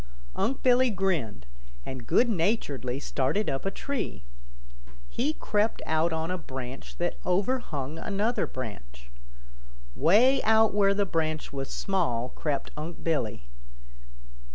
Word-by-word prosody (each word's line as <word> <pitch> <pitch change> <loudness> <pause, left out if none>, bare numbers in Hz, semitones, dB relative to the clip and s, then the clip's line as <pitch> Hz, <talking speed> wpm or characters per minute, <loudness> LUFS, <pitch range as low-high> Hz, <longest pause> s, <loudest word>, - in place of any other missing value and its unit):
Unc' 265 +3 -1
Billy 255 0 +5
grinned, 170 - -1 0.4
and 130 -3 -7
good 245 - +4
naturedly 160 - 0
started 145 +7 0
up 135 +7 -2
a - - +3
tree. 240 - -4 0.9
He 280 +6 0
crept 215 -6 0
out 160 +2 +2
on 160 +2 -1
a 185 - -2
branch 130 -3 -7
that 175 0 -2
overhung 180 - -1
another 210 +5 0
branch. - - -8 0.8
Way 235 - +5
out 220 -1 +4
where 200 -1 +4
the 200 0 +2
branch 155 -4 -2
was 135 -1 -4
small 130 - 0
crept 145 0 -3
Unc' 160 +3 -6
Billy. 120 - -1
165 Hz, 125 wpm, -28 LUFS, 135-210 Hz, 0.9 s, Billy